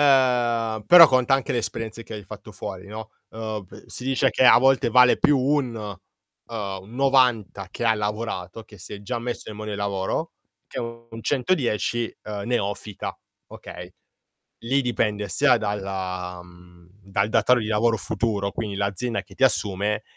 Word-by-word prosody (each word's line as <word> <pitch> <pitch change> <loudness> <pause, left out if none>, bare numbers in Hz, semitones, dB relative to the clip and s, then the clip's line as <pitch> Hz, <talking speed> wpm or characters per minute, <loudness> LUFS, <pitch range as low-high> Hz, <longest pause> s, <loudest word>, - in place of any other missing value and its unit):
Ehm, 120 -5 +3
però 175 -2 +10
conta 130 +1 +3
anche 135 - -1
le 120 - 0
esperienze 115 0 -4
che - - -8
hai 105 -2 -8
fatto 105 +2 -11
fuori, 95 0 -7
no, 110 +1 -8 0.2
uhm, 110 -2 -5
p - - -15
si 125 - -8
dice 135 0 +2
che 130 - +2
a - - +8
volte 135 +1 +3
vale 125 0 +6
più 145 - +4
un 130 -2 +1
uhm, 105 -1 -8
un 110 +5 -14
90 125 -8 +2
che - - -5
ha 110 -1 +4
lavorato, 105 -2 -4
che 105 - -16
si - - -11
è 100 - -9
già 120 +3 -3
messo 120 +1 -5
in 105 - -9
mondo 110 0 -6
del 100 - -4
lavoro, 100 -2 -2 0.4
che - - -7
un 115 -1 -8
110, 125 - 0
uhm, 105 -2 -5
neofita, 105 -4 -3 0.3
okay. 90 +1 -10 0.7
Lì 135 +3 +2
dipende 105 -4 -1
sia 130 +5 +4
dalla 95 -3 -4
mhmm, 90 0 -18
dal 100 +2 -1
datore 115 +3 +3
di 110 - -4
lavoro 110 +1 +2
futuro, 100 -1 -1
quindi 105 -3 -4
l'azienda 100 +4 -2
che - - -17
ti - - +2
assume, 105 -3 +1
110 Hz, 170 wpm, -24 LUFS, 100-125 Hz, 0.7 s, però